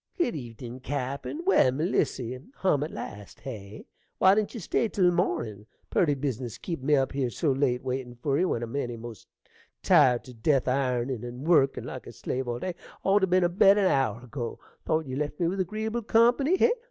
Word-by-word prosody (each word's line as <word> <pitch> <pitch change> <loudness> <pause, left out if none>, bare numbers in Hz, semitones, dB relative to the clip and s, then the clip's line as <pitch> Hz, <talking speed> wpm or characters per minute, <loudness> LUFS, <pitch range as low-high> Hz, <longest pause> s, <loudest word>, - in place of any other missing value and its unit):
Good 335 -10 0
evenin', 120 -2 -8
cappen! 140 - -4
Well, 380 - +5
Melissy, 130 -4 -1 0.2
hum 165 -7 +1
at 150 - -3
last, 105 - -8
hey? 105 -5 -8 0.3
Why 190 +1 +6
didn't 215 +3 0
you - - -4
stay 215 +4 0
till 180 -4 +3
mornin'? 115 - -1 0.2
Purty 150 -5 +3
business 130 -4 -3
keepin' 165 -7 -5
me 150 - +5
up 135 -1 +1
here 135 -3 -1
so 145 +4 0
late 130 -2 +1
waitin' 130 -1 -4
for 135 +3 0
you, 185 0 +2
when 120 - -1
I'm 115 +3 -6
eny 120 -4 -2
most 115 -3 -10 0.6
tired 140 -9 +5
to 125 - -12
death 130 +4 +1
iornin' 125 -2 0
and 120 +3 -7
workin' 140 -6 +3
like - - -7
a - - -9
slave 130 0 -3
all 120 0 -2
day, 180 +8 -3 0.3
ought 195 +1 +4
to 190 - +2
ben 185 0 +3
abed 195 +3 +5
an 200 - +3
hour 120 -4 0
ago. 125 -2 -5 0.3
Thought 160 0 +1
ye 130 -1 -5
left 150 +1 -3
me 170 - +2
with 190 +3 -2
agreeable 215 +5 -2
company, 240 - +3
hey? 470 - +4
135 Hz, 200 wpm, -27 LUFS, 125-180 Hz, 0.6 s, Why